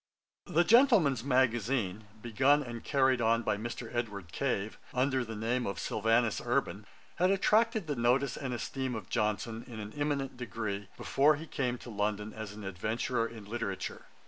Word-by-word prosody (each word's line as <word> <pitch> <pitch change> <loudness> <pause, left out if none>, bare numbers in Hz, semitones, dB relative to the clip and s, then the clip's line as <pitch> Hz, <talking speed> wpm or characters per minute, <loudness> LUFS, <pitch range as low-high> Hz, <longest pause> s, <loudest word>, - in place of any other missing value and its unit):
The 170 +3 +3
Gentleman's 205 - +5
Magazine, 120 -5 +1 0.2
begun 135 +5 +3
and 120 -3 -7
carried 130 -3 +2
on 115 +1 +3
by 105 - +1
Mr. 115 +2 -6
Edward 105 -8 -3
Cave, 110 -4 -2 0.2
under 130 0 +2
the 110 -1 -6
name 115 +4 -1
of 100 -2 -3
SYLVANUS 115 +5 +1
URBAN, 120 -4 -1 0.3
had 180 +2 +3
attracted 215 +2 +3
the 150 -2 -2
notice 125 +2 +2
and 135 -2 -4
esteem 130 +1 -3
of 105 -3 -7
Johnson, 110 +1 -1
in 115 -3 -8
an 105 0 -7
eminent 145 -3 -2
degree, 105 -5 -4
before 145 +3 +3
he 155 +3 -7
came 125 -5 -2
to 120 - -10
London 105 0 -2
as 110 -2 -6
an 105 0 -9
adventurer 110 +5 -1
in 110 -3 -10
literature. 100 -4 -4
120 Hz, 165 wpm, -31 LUFS, 110-135 Hz, 0.3 s, Gentleman's